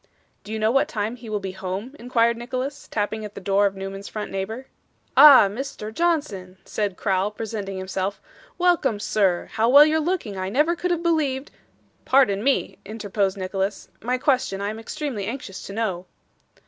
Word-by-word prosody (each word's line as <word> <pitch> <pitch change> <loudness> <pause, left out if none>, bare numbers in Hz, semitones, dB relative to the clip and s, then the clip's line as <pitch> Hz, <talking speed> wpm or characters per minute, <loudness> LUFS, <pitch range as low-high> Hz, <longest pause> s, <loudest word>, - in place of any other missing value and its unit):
'Do 210 - -10
you 220 - -2
know 220 +1 +2
what 270 +2 +3
time 215 +2 -3
he 240 -2 -11
will 210 -1 -1
be 195 -1 -5
home?' 190 +7 -5
inquired 235 -1 +2
Nicholas, 255 +4 -5
tapping 215 +1 -2
at 210 -1 -8
the - - -6
door 200 +1 +2
of 195 - -5
Newman's 195 +1 -6
front 210 -1 -5
neighbour. 220 +7 -4 0.5
'Ah, 280 -8 +9
Mr. 220 0 -6
Johnson!' 255 - -1
said 205 -3 -2
Crowl, 195 -1 +1
presenting 210 -3 -5
himself. 190 +1 -3 0.4
'Welcome, 345 - +2
sir. 195 -4 +1
How 225 +2 +1
well 285 +3 +9
you're 310 +1 +2
looking! 310 - -2
I 185 0 -3
never 300 - +2
could 360 +1 -2
have 345 -1 0
believed 295 -5 0 0.3
' - - -38
'Pardon 220 -7 +3
me,' 275 +1 0
interposed 205 -2 -2
Nicholas. 195 +1 -3
'My 250 +3 0
question 255 -7 +1
I 200 +1 -2
am 220 - -7
extremely 235 -4 -4
anxious 230 -5 -6
to 195 - -7
know. 195 -5 -2
215 Hz, 180 wpm, -23 LUFS, 195-265 Hz, 0.5 s, Ah